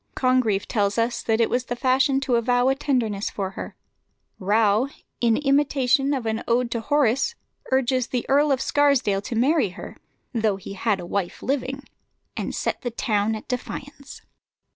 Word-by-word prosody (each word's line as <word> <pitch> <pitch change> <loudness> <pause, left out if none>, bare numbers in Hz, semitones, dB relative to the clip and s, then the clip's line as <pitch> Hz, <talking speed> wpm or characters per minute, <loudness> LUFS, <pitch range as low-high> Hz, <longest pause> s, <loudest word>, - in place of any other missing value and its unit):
Congreve 255 -6 +1
tells 205 -2 0
us 230 +1 0
that 225 0 0
it 230 - +4
was 250 0 -1
the 245 - -3
fashion 265 +2 +2
to 270 -2 -1
avow 245 +2 +3
a - - +4
tenderness 245 -8 -1
for 190 -2 -4
her. - - -7 0.6
Rowe, 210 +4 +2 0.3
in 230 -2 +3
an - - -4
imitation 275 -1 +2
of 255 -4 -4
an 220 0 -2
ode 235 0 +1
of 230 -2 -4
Horace, 285 - +2 0.4
urges 260 -1 +2
the 250 -2 -2
Earl 285 +2 +3
of 265 - +1
Scarsdale 280 -9 +2
to 230 - -5
marry 265 - +3
her 180 - -10 0.4
(though 220 -4 +1
he 195 0 -8
had 200 +1 0
a - - -6
wife 180 0 -3
living) 270 0 -2 0.5
and - - -4
set - - -2
the 245 - -2
town 220 -2 0
at 215 - -9
defiance. 275 +2 -6
245 Hz, 175 wpm, -24 LUFS, 220-270 Hz, 0.6 s, it